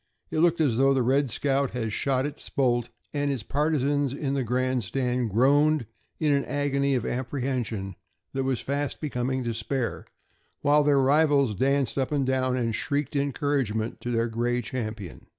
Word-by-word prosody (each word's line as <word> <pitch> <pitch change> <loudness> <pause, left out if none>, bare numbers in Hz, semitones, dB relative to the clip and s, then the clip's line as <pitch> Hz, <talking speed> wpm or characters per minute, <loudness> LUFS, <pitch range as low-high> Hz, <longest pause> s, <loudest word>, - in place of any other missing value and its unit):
It - - 0
looked 170 0 +3
as 135 -8 +2
though 135 +1 +4
the 130 - +2
"Red 135 +2 +2
Scout" 140 +3 0
had 110 -3 -2
"shot 130 +2 0
its 145 0 -7
bolt," 120 -4 +1 0.2
and 145 -1 0
its 130 -6 -3
partisans 145 0 0
in 140 -1 -2
the 140 - 0
grandstand 125 0 0
groaned 140 +5 +3 0.3
in 155 -2 +2
an 140 -1 +2
agony 140 -1 0
of 125 - -1
apprehension 120 -6 -3 0.4
that 135 0 -1
was 130 -2 -1
fast 140 +1 -2
becoming 130 -3 -2
despair, 115 +2 -3 0.5
while 145 +1 +4
their 145 -1 +3
rivals 140 -2 +3
danced 135 +5 +1
up 130 - -1
and 140 -3 +1
down 130 -1 +1
and 115 -2 0
shrieked 145 +3 -2
encouragement 140 -5 -1
to 120 - -4
their 115 -1 +1
gray 120 +2 0
champion. 110 -7 -6
135 Hz, 165 wpm, -26 LUFS, 120-145 Hz, 0.5 s, though